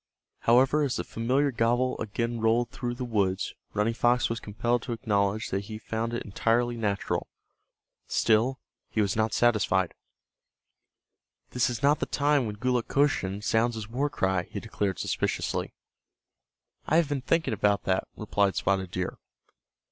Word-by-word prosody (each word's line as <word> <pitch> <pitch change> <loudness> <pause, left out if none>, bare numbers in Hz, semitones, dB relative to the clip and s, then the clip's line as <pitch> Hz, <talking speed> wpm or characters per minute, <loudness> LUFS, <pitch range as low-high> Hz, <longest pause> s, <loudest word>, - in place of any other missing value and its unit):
However, 130 +6 +4
as 140 -4 0
the - - -2
familiar 130 +5 0
gobble 120 +2 +1
again 115 +2 -2
rolled 115 +2 +2
through 120 -1 -4
the 125 0 -4
woods 100 -5 0 0.2
Running 105 +3 +1
Fox 120 0 +2
was 115 - -2
compelled 120 +3 -1
to 125 - -4
acknowledge 105 -1 0
that 100 +1 -2
he 110 0 -6
found 115 +1 -3
it - - -3
entirely 120 +4 +1
natural. 105 -4 -1 0.8
Still 115 +4 +2 0.3
he - - -2
was 100 -2 +2
not 110 0 +1
satisfied. 100 -5 +2 1.6
"This 125 0 +2
is 120 0 -5
not 145 +2 +4
the - - -2
time 145 -3 +2
when 105 -1 -5
Gulukochsun 125 -4 0
sounds 115 +2 +2
his 110 -2 -5
war 135 +6 -1
cry," 95 -8 0
he - - -5
declared, 95 -4 -2
suspiciously. - - -1 1.2
"I 155 - +2
have 165 -2 +4
been 145 -2 -2
thinking 160 0 +1
about 100 -1 +1
that," 95 0 0
replied 100 -2 +1
Spotted 95 -2 0
Deer. 90 0 -4
115 Hz, 150 wpm, -28 LUFS, 105-125 Hz, 1.6 s, However